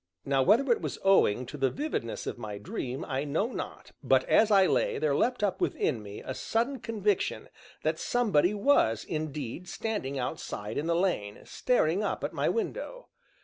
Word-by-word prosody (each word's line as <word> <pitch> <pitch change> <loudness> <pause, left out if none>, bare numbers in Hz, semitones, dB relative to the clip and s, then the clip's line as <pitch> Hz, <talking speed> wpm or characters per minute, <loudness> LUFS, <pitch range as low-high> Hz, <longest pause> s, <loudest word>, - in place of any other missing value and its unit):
Now 135 -1 +2
whether 235 - +4
it 235 - +2
was - - -4
owing 130 - +4
to 145 +5 -8
the 135 -1 +2
vividness 285 - -3
of - - -5
my 105 -3 -5
dream, 125 +5 -5
I 135 +1 -1
know 160 - -1
not, - - -7
but - - +4
as 225 - +4
I 195 -2 +6
lay, - - +1
there 150 -2 +1
leapt 245 - +1
up 190 -2 0
within 115 - 0
me 100 0 -9
a 130 - -3
sudden 240 - -1
conviction 210 -3 -1 0.3
that - - 0
somebody 210 -6 +2
was 200 - +3
indeed 155 +1 -4
standing 175 -12 -3
outside 120 -5 -4
in 155 - -3
the 170 - +2
lane, 170 - -1
staring 195 -7 +1
up - - -2
at - - -2
my - - +1
window. - - -3
170 Hz, 180 wpm, -29 LUFS, -, 0.3 s, I